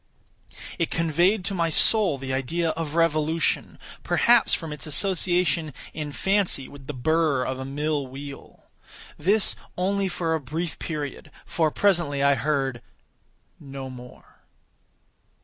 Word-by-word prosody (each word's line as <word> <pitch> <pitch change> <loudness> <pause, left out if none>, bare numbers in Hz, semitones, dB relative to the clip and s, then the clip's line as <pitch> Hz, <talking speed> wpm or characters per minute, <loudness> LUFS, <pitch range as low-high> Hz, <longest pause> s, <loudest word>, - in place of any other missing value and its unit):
It 165 - +1
conveyed 175 +5 +2
to 200 - -1
my 170 -3 +1
soul 195 -1 +4
the 130 0 -4
idea 160 +6 0
of 160 -1 -4
revolution—perhaps 165 +8 +1
from 160 -3 -6
its 145 -2 -6
association 175 -2 +1 0.2
in 150 -2 -4
fancy 190 -6 0
with 140 -2 -13
the 150 - -4
burr 150 0 +1
of 130 0 -3
a 130 - -4
mill 145 0 -2
wheel. 140 +2 -10 0.6
This 200 +6 +3 0.2
only 195 +2 +1
for 170 -3 -1
a 160 - +1
brief 160 +5 -4
period, 150 -4 -5 0.2
for 160 -2 +1
presently 165 -6 +1
I 140 0 +5
heard 135 -3 -1 0.8
no 135 -2 -7
more. 125 -1 -13
155 Hz, 130 wpm, -25 LUFS, 140-175 Hz, 0.8 s, I